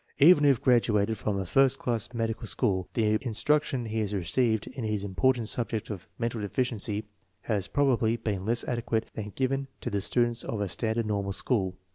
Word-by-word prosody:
Even 150 +1 +7
if 135 -5 +5
graduated 110 -4 +3
from 105 -2 -1
a 95 - -2
first 135 +7 +3
rank 120 0 -1
medical 115 0 -2
school, 95 0 0
the 110 -2 +2
instruction 130 +1 +1
he 110 0 -2
has 105 -1 -1
received 110 +4 +1
in 130 - -7
the 105 -2 -1
important 120 +4 +1
subject 115 -1 -2
of 95 -5 -7
mental 115 -1 -2
deficiency 105 -1 -2 0.4
has 100 -4 -1
probably 125 -5 +2
been 105 -5 -3
less 115 +3 0
adequate 115 -2 -1
than 110 - -5
that 105 - -10
given 135 +1 0
to - - -4
the 100 -1 0
students 120 +3 +1
of 110 - -4
a 100 - 0
standard 115 +3 -1
normal 100 -2 -1
school. 95 -4 0
115 Hz, 185 wpm, -28 LUFS, 105-125 Hz, 0.4 s, Even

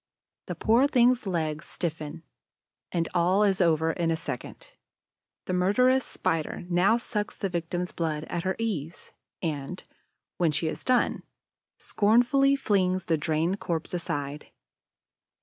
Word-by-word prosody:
The - - -4
poor 240 +5 +4
thing's 250 -4 +3
legs 160 -4 -2
stiffen; 160 -1 -4 0.7
and 165 -1 0
all 180 +4 +3
is 195 -2 +2
over 160 -2 +3
in 170 0 -1
a 165 - +2
second. 160 -7 -7 0.7
The 185 - -2
murderess 250 +9 +3
Spider 160 +1 -2
now 185 +6 +4
sucks 210 -3 -3
the 195 - -2
victim's 175 +1 -3
blood 155 -3 -2
at 170 +1 -3
her 190 +1 -1
ease 180 -8 -4 0.3
and, 155 +2 -3 0.5
when 170 -2 +3
she 145 +2 -1
has 160 - -3
done, 255 -1 +2 0.6
scornfully 245 +6 +3
flings 185 -8 +1
the 165 - +2
drained 160 +5 0
corpse 165 0 -3
aside. 145 -4 -3
175 Hz, 130 wpm, -27 LUFS, 160-210 Hz, 0.7 s, poor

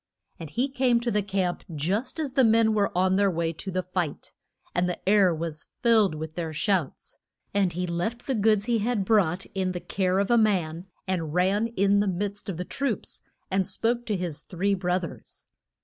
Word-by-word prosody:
And 160 - -7
he 245 - 0
came 255 -3 +2
to 240 0 -1
the 210 - +2
camp 190 -3 -1
just 205 - -1
as 290 -5 -2
the 265 - +4
men 225 -1 +4
were 205 -2 +1
on 185 +1 +3
their 200 0 +4
way 165 -2 -1
to 180 +5 -7
the 185 0 -1
fight, 180 -4 -4 0.4
and 180 +1 +1
the 180 - -6
air 200 -2 +5
was 160 -1 -5 0.2
filled 220 -7 +4
with 155 0 -6
their 165 -1 -4
shouts. 180 -2 -1 0.3
And 195 -3 +2
he 180 +2 -2
left 180 +8 -3
the 270 - 0
goods 215 -2 +3
he 235 -1 +1
had 215 -2 0
brought 190 -4 +2
in 185 -1 -1
the 175 - -3
care 185 0 0
of 200 +3 +1
a 235 - +6
man, 180 -5 0 0.2
and 165 -4 -2
ran 195 +5 +2
in 200 -3 +2
the 205 - +1
midst 200 +2 -3
of 180 - -3
the 180 - -4
troops, 275 -2 -3 0.3
and 190 -1 +1
spoke 235 +1 -1
to 210 -3 0
his 170 -5 -3
three 195 +4 -1
broth 180 -1 0
ers. 170 - -8
195 Hz, 205 wpm, -26 LUFS, 175-220 Hz, 0.4 s, a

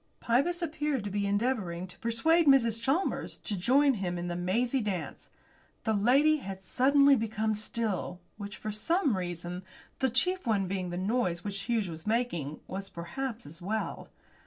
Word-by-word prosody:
Pybus 330 +10 +1
appeared 300 -6 -1
to 205 - -4
be 200 0 0
endeavouring 200 -5 0
to 180 - -13
persuade 310 +9 +2
Mrs. 230 -5 +5
Chalmers 280 +10 0
to 210 - -4
join 270 +9 +4
him 185 -5 -2
in 175 0 -3
the 175 - -2
mazy 235 +9 +1
dance. 195 -6 -4 0.5
The 220 - +1
lady 270 +9 +4
had 195 -8 -7
suddenly 280 +6 +5
become 220 -2 0
still, 210 -4 -2 0.2
which, 205 -1 -7
for 215 - -4
some 285 - +1
reasons, 175 -1 -4 0.4
the 265 - +2
chief 360 +7 +1
one 200 -4 +2
being 185 -1 -2
the 175 - -4
noise 185 -3 0
which 200 -1 -2
Hughes 225 -4 +1
was 165 +2 -8
making, 195 - -1
was 195 +1 -6
perhaps 225 - -5
as 165 +4 -10
well. 215 +4 -3
215 Hz, 165 wpm, -30 LUFS, 185-260 Hz, 0.5 s, Mrs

